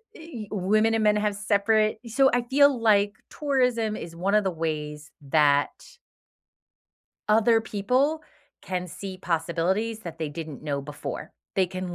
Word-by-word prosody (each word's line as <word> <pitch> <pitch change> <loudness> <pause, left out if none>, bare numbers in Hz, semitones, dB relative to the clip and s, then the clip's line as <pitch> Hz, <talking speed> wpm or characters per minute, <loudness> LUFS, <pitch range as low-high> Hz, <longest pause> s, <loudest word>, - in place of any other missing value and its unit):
eh 305 -10 -8
women 215 +3 +2
and 225 -1 +1
men 210 0 +4
have 210 0 0
separate 210 +2 +2
so 265 +4 +3
I 245 - +3
feel 275 +2 +4
like 205 -2 +3 0.2
tourism 250 -7 0
is 165 -4 -7
one 190 +5 0
of 210 - +4
the 190 - 0
ways 155 -2 -4 0.2
that 145 -1 +4 1.6
Other 225 +1 +4
people 255 +9 0 0.4
can 180 -1 -3
see 190 +2 -8
possibilities 180 +6 -1
that 165 -5 -8
they 160 -2 -2
didn't 155 -2 -7
know 145 -2 -2
before. 145 +1 -7 0.2
They 190 -1 +2
can 185 -1 -5
205 Hz, 145 wpm, -26 LUFS, 165-225 Hz, 1.6 s, men